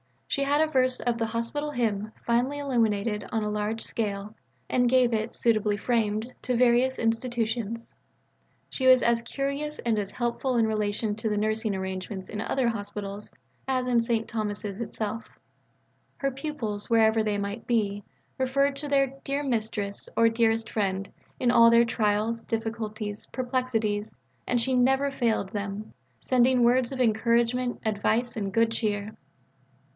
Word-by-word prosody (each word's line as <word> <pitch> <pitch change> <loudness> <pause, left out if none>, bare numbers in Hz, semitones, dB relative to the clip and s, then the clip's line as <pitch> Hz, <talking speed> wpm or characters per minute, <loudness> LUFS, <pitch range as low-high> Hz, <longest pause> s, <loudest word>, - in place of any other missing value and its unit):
She 275 - 0
had 290 +2 +3
a 315 - +4
verse 255 -2 +3
of 240 -1 -1
the 225 - 0
Hospital 235 +7 -3
Hymn 215 -5 -1
finely 245 +5 +1
illuminated 225 -6 0
on 220 -1 +1
a 210 - -1
large 210 +2 -2
scale 205 -1 -3 0.3
and 245 -1 +2
gave 250 -2 +4
it, 220 +1 -1
suitably 215 -3 +2
framed, 220 +2 -1
to 250 - 0
various 250 +2 +3
institutions. 230 -1 -1 0.8
She 260 - -1
was 255 -1 +7
as 235 0 +3
curious 280 +5 -3
and 225 -3 0
as 200 -1 -4
helpful 245 +1 -1
in 230 -1 +4
relation 210 0 -1
to 220 0 -1
the 210 - 0
nursing 215 0 0
arrangements 190 0 -5
in 210 -1 -4
other 250 +1 +1
hospitals 205 -1 -5 0.4
as 255 -1 0
in 240 -2 +3
St. 230 -1 0
Thomas's 210 -2 -3
itself. 225 -1 -4 0.9
Her 275 -1 -1
pupils, 260 -7 -4
wherever 225 -1 +4
they 210 -1 0
might 200 +3 -4
be, 205 -4 0 0.4
referred 275 +2 +1
to 290 +1 -5
their 275 -1 +3 0.2
"dear 280 +1 -1
Mistress" 220 -5 -2
or 230 0 +5
"dearest 225 -1 +1
friend" 195 -2 -1 0.3
in 245 -1 +3
all 230 -1 +7
their 235 0 +6
trials, 215 0 0
difficulties, 220 -2 -4
perplexities, 245 -5 -1 0.3
and 245 - +2
she 260 +3 0
never 265 +3 +3
failed 230 -7 0
them 205 0 -5 0.3
sending 255 0 +3
words 245 +1 +3
of 260 -1 -2
encouragement, 235 +2 +2
advice, 220 +3 0
and 200 -2 -3
good 230 +1 +3
cheer. 210 -2 -2
230 Hz, 150 wpm, -27 LUFS, 210-250 Hz, 0.9 s, was